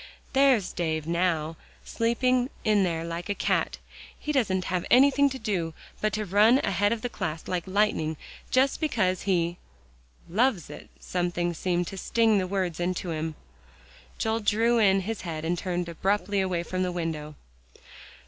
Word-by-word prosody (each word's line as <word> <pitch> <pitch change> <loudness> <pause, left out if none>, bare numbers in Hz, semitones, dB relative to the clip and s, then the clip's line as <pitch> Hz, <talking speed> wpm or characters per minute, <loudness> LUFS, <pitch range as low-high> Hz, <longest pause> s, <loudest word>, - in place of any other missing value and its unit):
There's 265 -8 +3
Dave 160 -3 -2
now, 165 -2 0 0.3
sleeping 250 +2 +1
in 210 -2 +3
there 165 -3 -1
like 170 +3 -5
a 205 - 0
cat; - - 0 0.4
he 300 - -3
doesn't 195 -10 +1
have 180 -2 -1
anything 280 +2 +5
to 265 - -5
do, 185 -9 -2 0.3
but 215 - +1
to 215 0 -1
run 210 +6 +5
ahead 200 +1 +1
of 230 -1 -2
the - - 0
class 160 -8 -5
like 180 -1 -2
lightning 190 -6 +1 0.3
just 265 +4 +2
because 190 - +1
he" 175 -2 +1 0.7
"Loves 200 - +1
it," - - -11
something 175 -1 -1
seemed 175 +1 -1
to 195 +2 -7
sting 225 -1 +3
the 185 - -1
words 185 -3 -2
into 175 0 -2
him. 160 0 -3 0.8
Joel 225 0 0
drew 225 +2 +2
in 195 -3 +4
his 220 +3 -4
head 160 -3 -5
and 170 +2 +1
turned 175 -1 -2
abruptly 195 +3 0
away 180 -3 -1
from 185 +1 -3
the 180 -1 0
window. 160 -3 -4
185 Hz, 160 wpm, -27 LUFS, 170-220 Hz, 0.8 s, anything